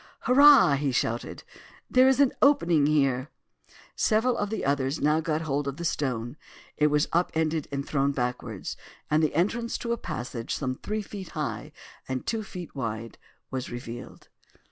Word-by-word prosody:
"Hurrah!" 270 - +7
he 140 -1 0
shouted, 120 -2 -2 0.4
"there 255 +1 +5
is 265 0 +3
an 280 -3 +4
opening 170 - +4
here." 135 -2 +1 0.7
Several 230 +3 +2
of 205 - -2
the 220 - -3
others 135 +1 0
now 150 +2 +2
got 160 -1 -1
hold 145 -2 -2
of 140 0 -4
the 170 - -5
stone. 125 -4 -2 0.4
It 150 - +3
was 150 0 +2
up 175 +2 +2
ended 160 -1 0
and 140 0 -3
thrown 140 -1 +1
backwards, 125 -5 -4 0.4
and 155 +1 +4
the 155 -2 0
entrance 230 +8 0
to 235 -1 -2
a - - -2
passage 120 - -5
some 130 -3 -2
three 210 +10 -4
feet 195 -3 -8
high 115 -8 -3 0.4
and 130 -1 -3
two 225 -1 -1
feet 180 -5 -8
wide 115 -3 -5 0.3
was 130 -2 -4
revealed. 120 0 -8
150 Hz, 165 wpm, -27 LUFS, 130-190 Hz, 0.7 s, Hurrah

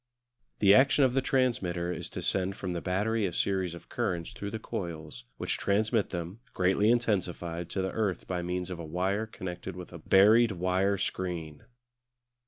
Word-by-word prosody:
The 100 -1 +7
action 135 +4 +5
of 125 - +1
the 135 - +2
transmitter 95 -11 0
is - - -6
to - - -6
send 95 0 0
from 95 -3 -4
the 85 - -3
battery 105 +3 0
a - - -4
series 95 -2 0
of 85 - -13
currents 85 -2 -2
through 100 - -5
the 110 - -4
coils, 80 - -6
which - - -1
transmit 110 +2 +1
them, 90 +4 -5 0.2
greatly 95 +3 +3
intensified, 90 -7 0
to 95 - -2
the 95 - -2
earth 100 -6 -1
by 90 -1 -2
means 90 +1 -3
of 90 - -5
a - - -5
wire 95 +7 -1
connected 95 -3 -6
with 90 -1 -9
a 85 - -8
buried 105 +7 +5
wire 95 +2 +1
screen. 85 -6 -4
95 Hz, 180 wpm, -29 LUFS, 90-105 Hz, 0.2 s, The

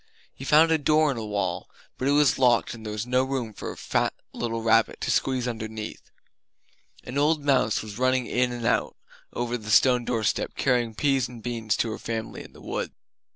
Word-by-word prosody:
He - - -10
found 155 +4 +5
a 160 - +3
door 155 +1 +3
in 130 - -4
a 115 - -4
wall; 100 -4 -2 0.3
but 130 - -1
it - - +3
was 145 -3 +3
locked 125 -3 +3
and 115 -2 -10
there 105 - -5
was 105 +1 -3
no 125 +1 +2
room 130 -5 -3
for - - -6
a - - -10
fat - - 0 0.2
little 115 -1 -3
rabbit 115 0 +3
to - - 0
squeeze 130 -2 0
underneath. 110 -2 -5 1.0
An 130 +3 -3
old 150 0 +2
mouse 130 -7 +2
was 105 +1 -8
running 130 -1 +2
in 125 +1 0
and 120 -1 -5
out - - +1 0.4
over 120 0 -2
the 105 0 -9
stone 125 +3 +5
doorstep, 115 -3 -1
carrying 120 -3 +1
peas 135 -2 +1
and 120 -2 -12
beans 115 -3 -1
to 115 - 0
her 110 - -6
family 115 -1 -5
in - - -15
the - - -15
wood. - - -4
120 Hz, 205 wpm, -26 LUFS, 110-130 Hz, 1.0 s, found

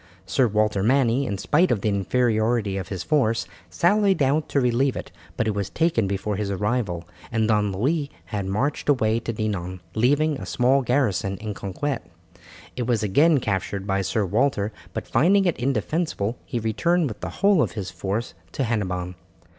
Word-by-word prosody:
Sir 120 +7 +2
Walter 105 -1 +1
Manny, 130 +3 +2
in 100 -3 -2
spite 165 - +2
of 105 - +1
the 110 - +1
inferiority 110 0 +1
of 95 -2 -4
his 95 -2 -4
force, 120 -7 +1 0.2
sallied 195 -2 +3
out 145 +3 +1
to 140 - +2
relieve 125 +1 +2
it, - - -7 0.3
but 115 - 0
it 110 - +1
was 100 -2 -2
taken 160 -11 +1
before 100 +1 -2
his 105 -1 -2
arrival, 100 -4 -1 0.2
and 110 -2 +1
Don 105 -2 +2
Louis 140 - 0 0.2
had 100 -4 -4
marched 130 +11 -1
away 115 -5 +3
to 115 - -4
Dinan, 95 -5 -3
leaving 145 +6 +2
a - - -7
small 130 +3 +3
garrison 115 - 0
in 105 +2 -5
Conquet. 115 +8 -3 0.8
It 125 -2 -3
was 115 -4 +1
again 145 - +4
captured 100 -2 -2
by 100 -1 0
Sir 105 +2 0
Walter, 105 +1 +1 0.2
but - - -5
finding 195 +5 +3
it 175 - +1
indefensible 125 - -1
he - - -3
returned 155 +10 +1
with 110 - -7
the - - -4 0.2
whole 200 -5 +5
of - - 0
his 100 -5 -5
force 95 +2 -3 0.2
to - - -1
Hennebon. 90 -6 -2
115 Hz, 180 wpm, -24 LUFS, 100-140 Hz, 0.8 s, whole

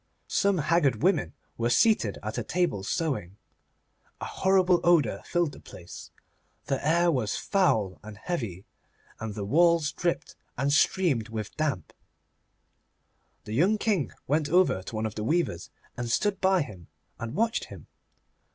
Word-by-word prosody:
Some 200 -1 +2
haggard 155 -2 +1
women 190 +3 +2 0.3
were 120 +1 +1
seated 210 - +3
at 110 +3 -3
a - - -3
table 175 - 0
sewing. 105 - -2 0.8
A - - -5
horrible 185 -2 +3
odour 150 - +3
filled 175 -3 0
the - - -12
place. 85 - -11 0.6
The 135 - -2
air 170 +3 +3
was 115 -8 -1
foul 110 - +1
and 105 -1 -10
heavy, 105 - -4 0.5
and 110 -2 -5
the 105 -2 -4
walls 165 +4 +3
dripped 170 -1 -2 0.2
and 140 +3 +1
streamed 145 - +2
with 110 -2 -5
damp. 140 - -2 1.5
The 105 - -7
young 185 - +3
King 205 - 0
went 150 +1 0
over 180 - +3
to 105 - -8
one 110 +1 -1
of 110 - -3
the 105 - -4
weavers, 135 - -1 0.3
and 120 -1 -4
stood 195 - 0
by 190 -3 +3
him 95 - -12 0.3
and 115 0 -5
watched 230 +2 0
him. - - -12
145 Hz, 150 wpm, -27 LUFS, 110-175 Hz, 1.5 s, seated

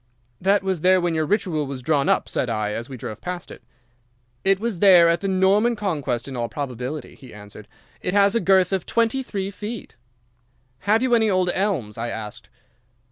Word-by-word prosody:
"'That 195 +1 +2
was 190 -4 -1
there 185 +1 +4
when 175 -1 0
your 155 -1 0
Ritual 175 -7 0
was 135 -2 -6
drawn 140 0 +1
up,' - - +2
said 125 - -2
I, 110 -2 -1
as 115 +4 -5
we 130 - -7
drove 110 -2 -7
past 180 -1 -6
it. - - -11 0.8
"'It 195 0 +3
was 220 -5 -3
there 180 -4 +7
at 170 0 +1
the 200 - -2
Norman 195 +5 +3
Conquest 145 - -2
in 135 - -7
all 120 -1 -2
probability,' 135 +1 -5
he 130 -3 -14
answered. 105 0 -12 0.3
'It 180 - -2
has 200 0 +4
a 230 - +2
girth 190 -1 +3
of 190 -3 -2
twenty 230 +3 +1
three 200 -6 -4
feet.' 210 +2 -7 0.8
"'Have 220 +4 +2
you 255 -2 +1
any 220 -2 +4
old 185 -2 +2
elms?' 160 - -2
I 115 - -2
asked. 105 -2 -7
180 Hz, 195 wpm, -23 LUFS, 135-200 Hz, 0.8 s, there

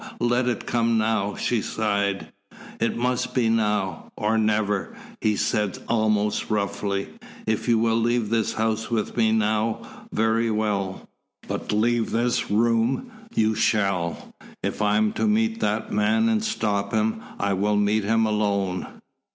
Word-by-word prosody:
Let 120 +1 +1
it 125 - -1
come 115 -1 +1
now!" 110 -2 0
she 120 -3 0
sighed. 100 -3 -1 0.5
"It 115 - 0
must 125 +1 -1
be 120 -3 +3
now 105 -6 0
or 105 +1 +1
never," 105 -2 0 0.3
he 105 -1 +2
said 105 -3 0
almost 110 -2 +1
roughly. 100 -1 -1 0.4
"If 110 +1 -1
you 115 -1 +4
will 115 0 +2
leave 115 -1 +1
this 115 -2 +1
house 110 0 -1
with 115 -3 -1
me 110 -2 +3
now, 110 0 -1
very 110 +1 +1
well. 105 -3 -1 0.4
But - - -3
leave 115 +2 +1
this 120 +1 0
room 115 - +1 0.2
you 110 0 +3
shall. 100 -6 0 0.3
If - - -2
I 105 0 +3
am 105 0 +2
to - - 0
meet 225 +1 +1
that - - -1
man 225 +1 +2
and 220 -1 +1
stop 105 - -1
him, 110 0 +1 0.2
I 100 0 +1
will 105 +2 +1
meet 105 +1 +2
him 115 +2 +2
alone." 100 -4 0
110 Hz, 150 wpm, -24 LUFS, 105-115 Hz, 0.5 s, you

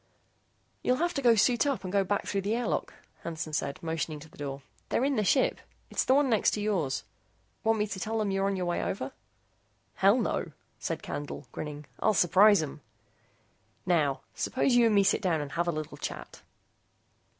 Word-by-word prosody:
"You'll 250 - +2
have 345 +5 0
to 275 - -1
go 240 -3 +6
suit 240 +5 +3
up 275 -7 -1
and 185 0 -5
go 200 -1 +4
back 200 +2 -1
through 200 - -1
the 205 +3 0
airlock," 240 0 -1 0.3
Hansen 160 -2 -5
said, 140 -2 -1
motioning 160 -1 -2
to 160 - -12
the - - -19
door. 140 -1 -5 0.3
"They're - - +1
in 280 - +2
their 215 - +1
ship. 260 +6 +2 0.3
It's - - +1
the 260 - +4
one 285 0 +4
next 225 -5 +3
to - - -3
yours. 190 -11 0 0.6
Want 225 0 +3
me 210 - +1
to 200 -2 -5
tell 225 +3 -2
them 210 -2 0
you're 195 0 +1
on 200 - 0
your 185 -1 -2
way 175 0 0
over?" 135 -8 -3 0.9
"Hell, - - +5
no," - - -1 0.3
said - - -3
Candle, 145 -2 -5
grinning, 150 -1 -6
"I'll 215 - +2
surprise 190 +2 +6
'em. 150 0 -7 1.0
Now, 155 -6 +2
suppose 260 0 0
you 240 -1 +6
and 215 - +2
me 200 - +6
sit 195 - +2
down 175 -6 +1
and 145 -1 -5
have 170 +1 -1
a - - +2
little 155 -2 -5
chat." - - -7
195 Hz, 200 wpm, -29 LUFS, 155-220 Hz, 1.0 s, go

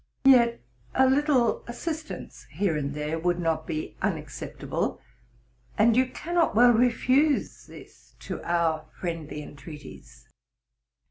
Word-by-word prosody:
Yet 240 -3 +6 0.3
a 265 0 +5
little 270 -3 +2
assistance 310 +6 -6
here 195 -6 0
and 145 -1 -3
there 150 +2 -2
would 175 +1 +1
not 160 -2 -1
be 155 -1 -4
unacceptable, - - -3 0.8
and 225 +1 +5
you 255 +1 +4
cannot 335 +1 0
well 240 +2 +7
refuse 255 +5 +2
this - - -15
to - - -6
our 165 -2 0
friendly 160 -4 -4
entreaties. 70 - -12
205 Hz, 115 wpm, -26 LUFS, 155-255 Hz, 0.8 s, well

